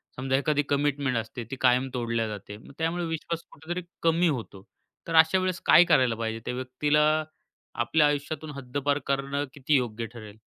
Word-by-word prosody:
समजा 130 +1 -1
एखादी 145 0 +1
कमिटमेंट 140 -3 +1
असते, 115 +2 -4
ती - - -2
कायम 125 +1 +4
तोडल्या 115 -2 -1
जाते. 105 -1 -7
मग 110 - -15
त्यामुळे 165 +2 -1
विश्वास 165 +1 -4
कुठेतरी 175 +4 -5 0.2
कमी 165 +2 +3
होतो. 115 - -4 0.4
तर 165 - -2
अशावेळेस 185 +3 +4
काय 175 - +8
करायला 130 -6 +4
पाहिजे? 115 0 -3
त्या 125 - -2
व्यक्तीला 130 +4 +1 0.8
आपल्या 150 +5 +3
आयुष्यातून 145 +1 -3
हद्दपार 140 +2 -1
करणं 140 +1 -1
किती 145 +1 0
योग्य 120 -3 -1
ठरेल? 110 -3 -11
140 Hz, 160 wpm, -27 LUFS, 125-155 Hz, 0.8 s, काय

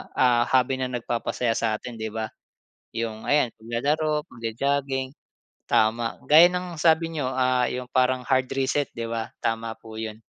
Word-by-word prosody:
ah, 120 -2 +4
hobby 130 0 +2
na 130 - 0
nagpapasaya 120 0 -2
sa 110 -2 +1
atin 115 +1 -8
'di 110 - -3
ba? 110 -1 -3 0.6
'Yong 110 -1 -3
ayan 145 -5 +3
paglalaro, 150 +7 0
pagjo-jogging. 135 +3 -2 0.6
Tama. 115 +1 +2
Gaya 160 +4 +9
ng 180 -1 -4
sabi 165 0 +3
niyo, 145 -5 -1
ah, 130 -1 +2
'yong 125 0 -5
parang 130 0 +2
hard 130 -1 +2
reset 135 +2 +1
'di 115 - -3
ba, 115 -1 -3
tama 115 0 -1
po 110 -1 -11
'yon. 110 -1 -5
125 Hz, 155 wpm, -25 LUFS, 115-140 Hz, 0.6 s, Gaya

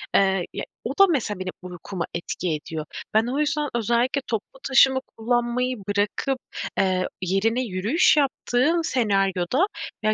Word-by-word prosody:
eee, 190 -2 +3
ya, - - -4 0.2
o 240 - -3
da 395 - +9
mesela 220 - -1
benim 185 0 -3
uykuma 180 0 -5
etki 175 +1 -3
ediyor. 155 +1 -5 0.3
Ben 220 +2 +3
o 265 +4 -1
yüzden 300 0 0
özellikle 240 +4 +1
toplu 230 +4 -4
taşıma 265 0 +5 0.2
kullanmayı 240 +2 0
bırakıp, 205 +6 -1 0.4
eee, 185 -1 +2 0.2
yerine 200 +7 +1
yürüyüş 220 - +2
yaptığım 285 +3 +2
senaryoda, 200 - +1 0.4
ya, 215 0 +3
225 Hz, 135 wpm, -24 LUFS, 190-260 Hz, 0.4 s, da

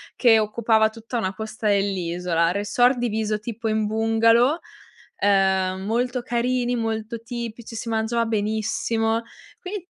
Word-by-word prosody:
che 230 -3 +5
occupava 220 0 +2
tutta 225 +2 -6
una 190 -4 -1
costa 220 +1 -5
dell'isola, 180 -4 0
resort 210 +6 +2
diviso 220 -2 -1
tipo 225 +1 -5
in 215 -1 +1
bungalow, 230 +6 +3 0.6
ehm, 190 -2 +2
molto 245 +2 0
carini, 245 0 0
molto 225 0 -3
tipici, 235 -1 -6
si 230 +1 -5
mangiava 225 +1 0
benissimo, 225 +1 0 0.4
quindi 375 -1 -6
225 Hz, 120 wpm, -23 LUFS, 210-235 Hz, 0.6 s, che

